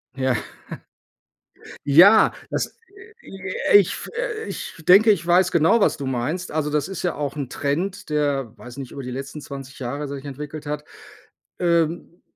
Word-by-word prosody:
Ja. 130 -2 +1 1.5
Ja, 180 +10 +7 0.2
das - - -3 0.5
äh, 195 +1 +2
ich 200 -2 +4
f - - -6 0.4
ich - - -6
denke, 205 +5 +8
ich 175 -4 0
weiß 180 +1 +4
genau, 170 +8 +4
was - - +3
du 140 - -5
meinst. 130 +8 -2
Also, 150 -1 -1
das 150 0 0
ist 195 - -6
ja 180 - 0
auch 145 -1 -3
'n 140 -4 -4
Trend, 165 +10 -3
der, 140 -6 0
weiß 125 +1 -11
nicht, 135 -3 -7
über 140 - -7
die 125 - -6
letzten 135 +4 -6
20 135 -1 -9
Jahre 140 +3 -4
sich 140 0 -7
entwickelt 150 +2 -7
hat. 150 0 -4 0.8
Ähm, 170 0 0
150 Hz, 160 wpm, -22 LUFS, 140-175 Hz, 1.5 s, denke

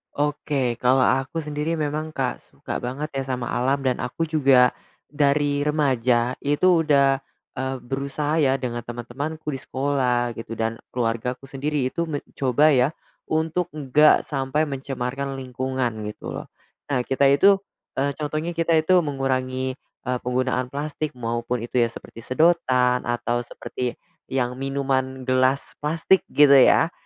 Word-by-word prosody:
Oke, 145 -4 -1
kalau 130 +1 +4
aku 135 +5 0
sendiri, 150 +2 -2
memang, 155 +1 -3
Kak, 130 -2 -1
suka - - -7
banget 140 +5 -4
ya 135 -1 -2
sama 125 -2 -3
alam 135 +3 0
dan 130 -1 0
aku 130 +7 -2
juga, 135 -6 +4 0.4
dari 145 0 +1
remaja 130 -5 +1
itu 165 +4 +3
udah, 140 -3 +3 0.4
eee, 130 0 -2
berusaha 140 +4 -2
ya 135 0 +2
dengan 120 -2 -4
teman-temanku 125 +7 -6
di - - -5
sekolah 130 -4 0
gitu, 115 0 -8
dan 115 0 -1 0.2
keluargaku 125 +2 -2
sendiri 140 0 -1
itu 170 +6 -2
me 145 -2 -2 0.2
coba 140 +4 +3
ya, 125 +3 +4 0.4
untuk 165 +3 -1
enggak 150 +1 +4
sampai 140 +1 -1
mencemarkan 135 0 -4
lingkungan, 130 -3 -3
gitu - - -8
loh. - - -7 0.4
Nah, 125 -2 +1
kita 135 +1 +1
itu, 195 +9 +6 0.4
eee, 140 +1 +1
contohnya 155 +3 -2
kita 165 0 +2
itu 160 +4 +4
mengurangi, 130 -3 -1
eee, 125 -1 -5
penggunaan 125 0 0
plastik, 150 +1 -4
maupun 120 0 -2
itu 125 +1 -1
ya, 120 - +4
seperti 115 - -11
sedotan 130 -5 +2
atau 120 0 0
seperti 125 +1 -5 0.3
yang 125 -1 -2
minuman 135 -1 -1
gelas 130 +1 +1
plastik, 165 +5 +2
gitu 145 -1 +5
ya. 160 +5 +6
135 Hz, 140 wpm, -23 LUFS, 125-150 Hz, 0.4 s, itu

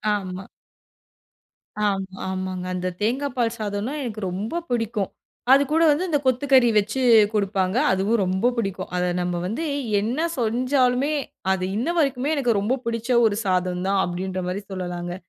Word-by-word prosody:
ஆமா. 190 -1 -5 1.4
ஆ - - +3 0.4
ஆமாங்க, 185 -1 -3
அந்த 180 0 -2
தேங்கா 255 +7 0
பால் 235 -1 +1
சாதம்னா 210 +4 -3
எனக்கு 225 -5 -5
ரொம்ப 210 - -3
பிடிக்கும், 225 -4 -1 0.4
அதுக்கூட 285 +4 +3
வந்து 305 +6 +2
இந்த 295 -3 +2
கொத்துக்கறி 260 -1 +4
வச்சு 215 +5 +1 0.3
குடுப்பாங்க, 195 -1 0
அதுவும் 200 +4 +1
ரொம்ப 190 +7 +1
பிடிக்கும். 195 -4 -3
அதை 180 0 +1
நம்ம 175 0 -1
வந்து 230 - -3 0.4
என்ன 255 +11 0
செஞ்சாலுமே, 250 +4 +1 0.4
அது 185 -1 -2
இன்ன 240 - -1
வரைக்குமே 275 0 +1
எனக்கு 245 -7 +1
ரொம்ப 240 +7 0
பிடிச்ச 230 +1 -3 0.2
ஒரு 205 -2 +2
சாதம் 180 -1 0
தான் 195 0 +2
அப்படின்ற 185 +1 -3
மாதிரி 190 +3 -3
சொல்லலாங்க. 175 -1 -4
215 Hz, 140 wpm, -23 LUFS, 185-250 Hz, 1.4 s, கொத்துக்கறி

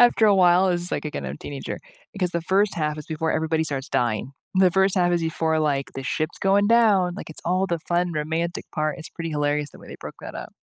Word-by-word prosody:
after 240 -2 +6
a 205 - +6
while. 180 0 +5
It's 175 -1 0
just, - - -4
like, - - -2
again, 145 - -4
I'm 70 - -4
a - - -10
teenager. 140 -1 -6 0.3
Because 185 -3 -1
the 170 -1 -1
first 195 +4 +2
half 150 -1 -1
is 150 - -8
before 160 +1 -1
everybody 160 0 +1
starts 140 -2 -3
dying. 120 +2 0 0.2
The 185 -1 +6
first 190 +2 +2
half 175 -1 +3
is 170 - +2
before, 160 -1 0
like, 140 -3 0
the 135 - -5
ship's 155 +3 -2
going 200 +1 +3
down, 210 -6 +4
like, 200 - -7
it's 160 - -7
all 185 +2 +1
the 170 -3 -1
fun 175 +1 0
romantic 160 +3 -2
part, 155 -1 0
it's 160 - -7
pretty 165 -1 -5
hilarious 145 -1 0
the - - -15
way - - -14
they - - -8
broke - - -8
that - - -7
up. - - -7
165 Hz, 255 wpm, -24 LUFS, 150-185 Hz, 0.3 s, after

